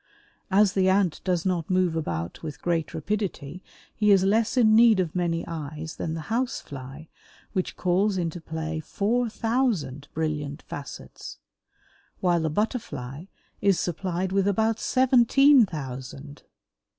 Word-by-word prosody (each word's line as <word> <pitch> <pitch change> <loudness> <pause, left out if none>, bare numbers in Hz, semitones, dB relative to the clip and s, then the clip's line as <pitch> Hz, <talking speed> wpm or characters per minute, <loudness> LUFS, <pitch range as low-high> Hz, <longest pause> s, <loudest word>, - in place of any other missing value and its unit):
As 195 0 +4
the 190 -1 +3
Ant 190 -3 +2
does 180 -2 0
not 175 -4 -1
move 185 -3 +2
about 85 - -3
with 155 -2 -7
great 165 -3 -1
rapidity 180 -3 -3 0.3
he 210 -1 +2
is 195 -2 +6
less 220 +5 +2
in 220 -3 +5
need 225 -3 +6
of 175 -3 -1
many 170 -2 -1
eyes 155 -1 -6
than 160 -1 -3
the 165 - -4
House 250 +2 0
fly 135 +3 -10 0.5
which 185 -3 -2
calls 190 +3 +1
into 170 -1 -3
play 160 0 -4
four 230 +9 0
thousand 210 - -1
brilliant 150 -2 -3
facets, 145 - -9 0.8
while 175 -2 +2
the 160 -1 0
Butterfly 160 - -3 0.4
is 200 -3 +3
supplied 180 +1 -2
with 195 0 +2
about 220 +2 +1
seventeen 260 0 +5
thousand. 135 -1 -8
180 Hz, 140 wpm, -26 LUFS, 155-210 Hz, 0.8 s, is